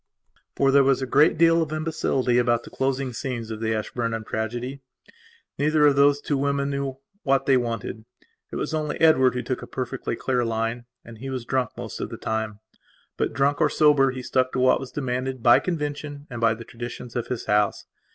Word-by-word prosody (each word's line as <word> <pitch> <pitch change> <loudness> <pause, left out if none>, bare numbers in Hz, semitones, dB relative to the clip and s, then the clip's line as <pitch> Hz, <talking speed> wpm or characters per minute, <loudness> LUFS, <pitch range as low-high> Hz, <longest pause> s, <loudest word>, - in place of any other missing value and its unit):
For 135 -1 +3
there 140 0 +6
was 135 0 +2
a - - 0
great 145 +6 +4
deal 165 0 +5
of 155 -2 -2
imbecility 155 -6 0
about 120 -1 +2
the - - -12
closing 135 -1 -1
scenes 115 -3 -4
of 110 - -5
the 110 0 -1
Ashburnham 115 +1 -3
tragedy. 120 +6 -4 0.8
Neither 150 +1 +3
of 145 -1 +5
those 140 +1 +4
two 145 -2 -1
women 140 0 0
knew 140 -1 -3 0.2
what 135 -2 +1
they 135 - +4
wanted. 115 -3 -3 0.5
It - - -6
was - - -3
only 155 -1 -2
Edward 130 -6 +5
who 125 - -2
took 125 +2 -3
a - - -8
perfectly 130 -1 -4
clear 125 +1 0
line, 115 +1 -2 0.2
and 115 -1 -12
he 135 +3 -6
was 130 -3 -4
drunk 130 -2 -1
most - - -6
of - - -3
the - - -7
time. 110 -1 -3 0.5
But, - - -1
drunk 140 +4 +1
or - - +4
sober, 145 -3 +4
he 130 -1 -5
stuck 130 0 +1
to - - -1
what 130 0 +4
was 135 -1 -8
demanded 130 -2 -3
by 120 - +7
convention 145 -3 -4
and 120 -1 -5
by 115 -1 +3
the 115 +1 -10
traditions 120 +1 -8
of 120 - -2
his 125 - -4
house. 105 -1 +1
130 Hz, 205 wpm, -24 LUFS, 120-140 Hz, 0.8 s, by